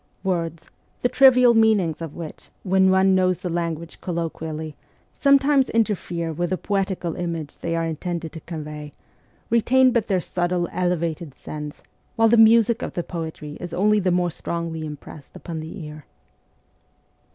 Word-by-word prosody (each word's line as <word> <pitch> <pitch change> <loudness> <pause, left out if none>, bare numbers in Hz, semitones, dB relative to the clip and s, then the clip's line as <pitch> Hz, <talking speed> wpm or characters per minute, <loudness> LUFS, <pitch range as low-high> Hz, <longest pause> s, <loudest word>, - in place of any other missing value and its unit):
Words, 170 -3 -2 0.4
the 245 - +3
trivial 255 -2 +6
meanings 215 -8 +3
of 160 -3 -6
which, 165 -3 -9
when 190 0 +3
one 190 0 +4
knows 185 -1 +2
the 180 -2 -5
language 170 -1 -4
colloquially, 160 -3 -4 0.4
sometimes 275 -1 +4
inter 225 -2 +2
fere 170 -3 -4
with 175 +2 -2
the 185 - 0
poetical 190 -4 -2
image 165 -4 -4
they 165 0 -2
are 165 0 0
intended 165 0 -4
to 160 - -8
con 160 -1 -7
vey, 150 -1 -8 0.6
retain 255 +3 +4
but 235 -3 0
their 190 -3 +2
subtle, 175 0 -1
elevated 170 -4 -2
sense; 150 -1 -8 0.3
while 225 -1 +4
the 235 - +5
music 230 0 +5
of - - -4
the 175 - -1
poetry 160 -4 -6
is 175 -1 -6
only 210 +3 +3
the 185 -2 +1
more 175 -1 +1
strongly 165 -1 -4
impressed 150 -1 -11
upon 165 -3 -6
the 160 +2 -7
ear. 150 -1 -10
175 Hz, 160 wpm, -23 LUFS, 160-200 Hz, 0.6 s, trivial